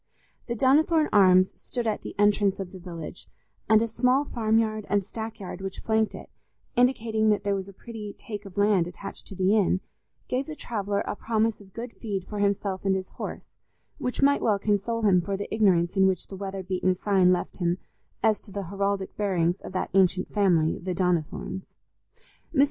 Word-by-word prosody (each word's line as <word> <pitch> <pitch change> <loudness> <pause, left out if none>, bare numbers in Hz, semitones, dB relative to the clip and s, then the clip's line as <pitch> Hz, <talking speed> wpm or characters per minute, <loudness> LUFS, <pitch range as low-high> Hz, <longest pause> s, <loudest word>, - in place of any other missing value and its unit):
The 235 - -2
Donnithorne 300 +5 +4
Arms 185 -2 +6
stood 240 -2 -4
at 215 -2 -1
the - - -8
entrance 205 -1 +3
of 190 -2 -5
the 190 - -10
village, 170 -1 -8 0.4
and 220 0 +6
a - - 0
small 250 +5 +2
farmyard 220 -3 0
and 205 -1 +2
stackyard 210 -3 -7
which 195 -1 -5
flanked 220 -1 +1
it, - - -11 0.4
indicating 230 -3 +2
that 210 -1 +2
there 200 0 +1
was 195 -1 -3
a - - -9
pretty 210 0 -8
take 210 -2 -7
of 195 0 -11
land 200 -4 +3
attached 180 +3 -9
to 195 - -8
the 190 +3 +3
inn, 195 -3 +3 0.5
gave 260 +2 -1
the 310 - -6
traveller 205 -6 -2
a - - -3
promise 220 0 0
of 195 -1 -16
good 235 +1 -6
feed 200 -5 -4
for 210 - -5
himself 200 -1 0
and 195 -1 +2
his 190 -1 -4
horse, - - -7 0.5
which 250 +2 -2
might 285 +1 +4
well 210 -3 +3
console 210 +3 0
him 190 -4 +5
for 195 +3 -3
the 200 - -5
ignorance 185 -5 +3
in 190 -1 +5
which 190 -1 -1
the 195 - -7
weather 195 0 -5
beaten 185 0 0
sign 190 -1 +3
left 180 - -1
him 175 -1 0 0.5
as 220 -2 +3
to 205 - -13
the 200 0 -4
heraldic 200 +1 -2
bearings 180 -3 +1
of - - -8
that 185 - -2
ancient 185 -1 +2
family, 175 -6 +3
the 180 0 -3
Donnithornes. 180 +1 -1 0.9
Mr. - - +2
200 Hz, 195 wpm, -26 LUFS, 185-220 Hz, 0.9 s, Arms